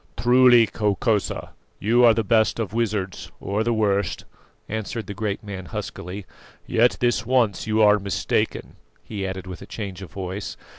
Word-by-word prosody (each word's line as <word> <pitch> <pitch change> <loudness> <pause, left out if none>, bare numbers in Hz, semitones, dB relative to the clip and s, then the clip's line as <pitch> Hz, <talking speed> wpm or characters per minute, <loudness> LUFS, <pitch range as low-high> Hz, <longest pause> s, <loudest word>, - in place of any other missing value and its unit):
"Truly, 120 +1 +6
Hokosa, 105 0 0 0.3
you 120 +4 +3
are 115 -2 +7
the 115 - +1
best 110 +2 +2
of 110 -3 -3
wizards, 105 -5 -2
or 100 +3 -1
the 120 - 0
worst," 100 -4 0 0.4
answered 110 +1 -4
the 100 - -6
great 105 0 -3
man 95 -3 -7
huskily. 90 +4 -6 0.4
"Yet 120 +2 +3
this 120 -1 +2
once 115 -4 +1
you 110 0 +3
are 105 0 +6
mistaken," 95 -5 -2 0.3
he 100 -3 -4
added 95 0 -5
with 90 -2 -8
a - - -10
change 100 -4 -6
of 95 - -8
voice. 95 +2 -5
105 Hz, 160 wpm, -23 LUFS, 95-115 Hz, 0.4 s, are